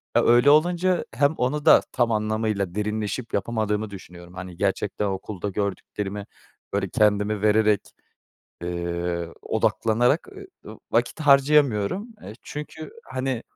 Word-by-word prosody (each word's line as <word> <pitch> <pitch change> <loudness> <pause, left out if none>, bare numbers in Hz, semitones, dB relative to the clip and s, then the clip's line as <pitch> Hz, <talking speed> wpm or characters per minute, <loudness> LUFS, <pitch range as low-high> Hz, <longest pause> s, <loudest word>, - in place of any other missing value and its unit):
E, - - +6
öyle 120 +4 +5
olunca 175 +4 +3
hem 140 +5 +3
onu 145 +4 -1
da - - +8
tam 120 -2 +1
anlamıyla 110 -3 -1
derinleşip 105 +3 -3
yapamadığımı 105 0 -1
düşünüyorum. 90 -3 -12
Hani, 90 -1 -8
gerçekten 100 +1 -1
okulda 100 0 -4
gördüklerimi, 100 +1 -4 0.5
böyle, 100 -1 -1
kendimi 105 0 +2
vererek, 105 -1 +3 0.8
eee, 85 0 -3
odaklanarak 120 - +1
e 390 -2 -13
ı - - -11
vakit - - 0
harcayamıyorum. 140 - +3
Eee, - - -8
çünkü, 150 +1 -8
hani, 130 -2 -3
105 Hz, 120 wpm, -24 LUFS, 100-130 Hz, 0.8 s, da